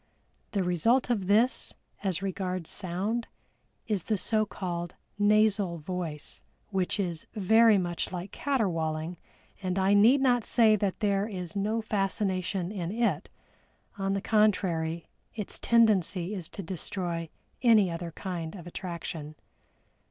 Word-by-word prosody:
The 200 -3 +1
result 225 +9 +2
of 200 -6 0
this, 225 +6 +2 0.3
as 190 -2 0
regards 185 -3 -2
sound, 200 +6 -1 0.6
is 205 -6 -1
the 215 - +1
so 215 +2 +1
called 175 -3 -4 0.2
nasal 205 -3 +3
voice, 160 -2 -5 0.3
which 190 +1 0
is 170 -4 -3
very 220 +2 +5
much 175 -2 -2
like 180 +1 -5
caterwauling, 170 - -1 0.4
and 185 -1 -2
I 190 +1 +3
need 225 +7 +6
not 245 -3 +3
say 220 -2 +4
that 200 +1 -2
there 200 -1 +1
is 180 -5 -6
no 215 +3 0
fascination 195 -2 -1
in 180 -4 -3
it 230 +2 0 0.7
on 195 -1 -1
the 195 - -1
contrary 175 -7 +1 0.3
its 210 -3 -4
tendency 205 -5 +3
is 180 -5 -5
to 195 - -7
destroy 170 -1 -3 0.3
any 215 -7 +5
other 170 0 -5
kind 170 -2 -5
of 175 -4 -9
attraction. 170 -4 -6
195 Hz, 130 wpm, -29 LUFS, 175-215 Hz, 0.7 s, need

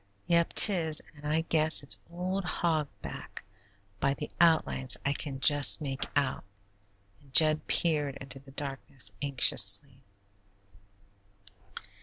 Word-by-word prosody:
"Yep, 170 -1 0
'tis, 165 -7 +7 0.2
and 145 0 -10
I 160 +1 0
guess 160 -2 +1
it's 140 - +1
old 185 +3 -4
Hog 160 -4 -2 0.2
Back - - -9 0.6
by 140 - -1
the 150 - -8
outlines 160 -6 +1
I 140 - 0
can 140 -3 -7
just 145 0 +3
make 135 -3 -4
out," 140 -3 -1 0.8
and 140 -2 -23
Jud 155 +2 +4
peered 150 -5 0
into 135 0 -7
the 135 +1 -19
darkness, 135 -6 -6
anxiously. 130 -2 0
145 Hz, 120 wpm, -28 LUFS, 135-160 Hz, 0.8 s, tis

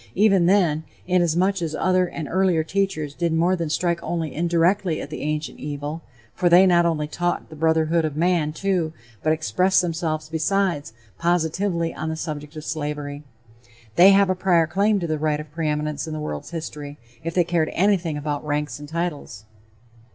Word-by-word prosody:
Even 195 -3 +4
then, 175 -5 +3 0.2
inasmuch 180 +1 +2
as 160 -2 -2
other 185 +1 +2
and 160 -3 -6
earlier 185 -2 +2
teachers 175 -5 -1
did 170 +2 -1
more 170 +3 +2
than 165 -3 -3
strike 170 +2 0
only 165 -5 -3
indirectly 170 +1 +1
at 145 - -7
the - - -5
ancient 150 +1 -3
evil, 145 +2 -5 0.3
for 175 - +1
they 180 +2 +7
not 175 -2 +4
only 150 -3 -1
taught 175 +2 -2
the - - -9
brotherhood 160 +1 +2
of 155 -2 -2
man, 170 -2 +2
too, 175 -2 -1 0.3
but 155 - +1
expressed 185 +4 +2
themselves, 160 -3 -2
besides, 165 - 0 0.3
positively 170 +1 0
on 160 - -4
the 160 - -2
subject 150 -1 -6
of 155 0 -7
slavery, 145 -2 -4 0.7
they 185 +3 +8
have 200 0 +5
a - - +3
prior 180 -3 +3
claim 200 +5 +1
to 175 - -3
the 155 -2 -2
"right 150 -1 0
of 150 -1 -9
preeminence" 150 -1 -2
in 160 - -5
the 155 - -4
world's 75 - -5
history, 150 -3 -6 0.3
if 165 +1 -4
they 180 - +4
cared 170 -2 0
anything 180 -5 +1
about 145 0 -3
ranks 150 -3 -2
and 145 0 -10
titles. 155 - -4
165 Hz, 180 wpm, -23 LUFS, 150-180 Hz, 0.7 s, they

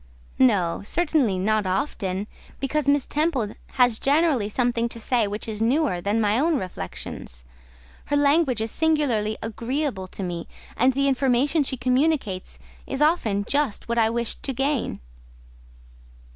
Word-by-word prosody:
"No, 200 -10 +3
certainly, 285 - +1
not 210 +1 +1
often; 190 -3 -2 0.3
because 280 +1 0
Miss 285 -2 +3
Temple 285 -9 0 0.2
has 245 -3 +3
generally 280 -7 +2
something 235 0 0
to 230 - -6
say 230 -1 +1
which 205 +3 -5
is 220 -1 -4
newer 245 - +1
than 205 +4 0
my 215 +1 +2
own 320 +1 +2
reflections; 85 - -7 0.6
her 290 - -1
language 285 -4 +3
is 220 0 -2
singularly 275 -10 +1
agreeable 230 -1 -3
to 195 - -7
me, 175 -2 -4 0.3
and 260 +2 +3
the 275 +2 +1
information 270 +3 +2
she 265 -2 -2
communicates 255 -6 0 0.3
is 270 - -3
often 235 - +2
just 280 -4 -1
what 235 0 0
I 220 -1 +4
wished 235 0 -2
to 270 - -2
gain." 270 - -1
245 Hz, 145 wpm, -24 LUFS, 210-285 Hz, 0.6 s, I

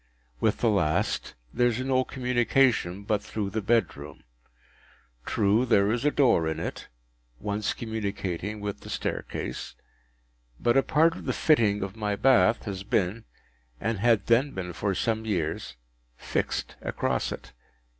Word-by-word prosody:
With - - +1
the 115 - +4
last 80 -7 0 0.2
there 120 0 +3
is 120 0 -1
no 130 0 +1
communication 125 -6 +1
but 105 0 0
through 100 -1 -4
the 110 +2 -2
bedroom. 100 -9 -1 1.0
True, 105 +3 +2
there 105 -4 +3
is 120 +2 -1
a 150 - +4
door 130 - +3
in 80 0 -2
it, - - -5 0.5
once 105 0 -2
communicating 105 -2 -4
with 105 -1 -4
the - - -11
staircase; - - -4 0.8
but 120 - +2
a 135 - +6
part 160 +4 +3
of - - -9
the - - 0
fitting 110 -10 +3
of 100 +1 -5
my 105 -2 -1
bath 115 0 +4
has 95 -3 -4
been—and 95 - -4
had 115 0 +3
then 130 +4 +3
been 90 -2 -4
for 100 +2 -1
some 110 +3 0
years—fixed - - -4
across 65 -1 -1
it. - - -8
105 Hz, 140 wpm, -27 LUFS, 95-120 Hz, 1.0 s, a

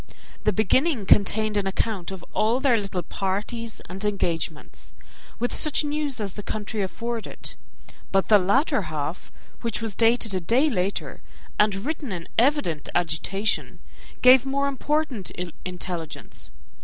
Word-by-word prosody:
The 210 - +5
beginning 225 - +2
contained 210 +2 +3
an 200 -1 0
account 195 -2 -1
of 190 -2 -8
all 225 +4 +2
their 265 -3 +4
little 195 -4 -3
parties 210 +6 -3
and 190 +3 -7
engagements, 170 -6 -3 0.4
with 245 - -1
such 305 0 +4
news 295 -3 -1
as 200 -3 -3
the 205 - -6
country 210 +1 -3
afforded; 230 +4 -4 0.6
but 195 -1 +2
the 210 -2 +7
latter 220 - +2
half, 155 +3 -4 0.3
which 230 -2 -1
was 225 -2 -2
dated 225 0 +3
a 185 - +1
day 255 - +2
later, 195 -2 -2 0.4
and 210 -1 +4
written 295 -5 -3
in 170 -3 -5
evident 245 - +1
agitation, 175 +5 0 0.5
gave 255 0 +8
more 280 +1 0
important 280 - -1 0.4
intelligence. 180 -3 -6
210 Hz, 135 wpm, -25 LUFS, 190-250 Hz, 0.6 s, gave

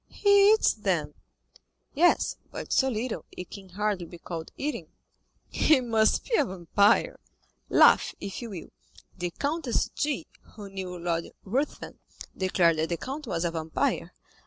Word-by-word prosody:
"He 405 0 +5
eats, 440 - +3
then?" - - -1 0.8
"Yes; 345 +5 +3 0.2
but - - -5
so 265 - +3
little, 235 0 -3
it 180 - -9
can 195 -2 -10
hardly 200 -2 -2
be 175 - -11
called 165 -1 -7
eating." 295 +2 -3 0.6
"He 305 -4 +3
must 225 -3 +1
be 465 - +2
a - - +4
vampire." 200 - +2 0.5
"Laugh, - - +5
if 200 +4 -6
you 235 - -6
will; 185 -6 -8 0.5
the 175 -1 -3
Countess 285 - -1
G——, 295 -2 -1 0.3
who 205 -2 -9
knew 185 -2 -5
Lord 170 -1 -2 0.2
Ruthven, 260 +9 -3 0.4
declared 180 -3 +2
that 160 - 0
the 170 - -1
count 275 - -6
was 170 -4 -1
a 170 - 0
vampire." 160 -1 -2
205 Hz, 150 wpm, -27 LUFS, 175-270 Hz, 0.8 s, He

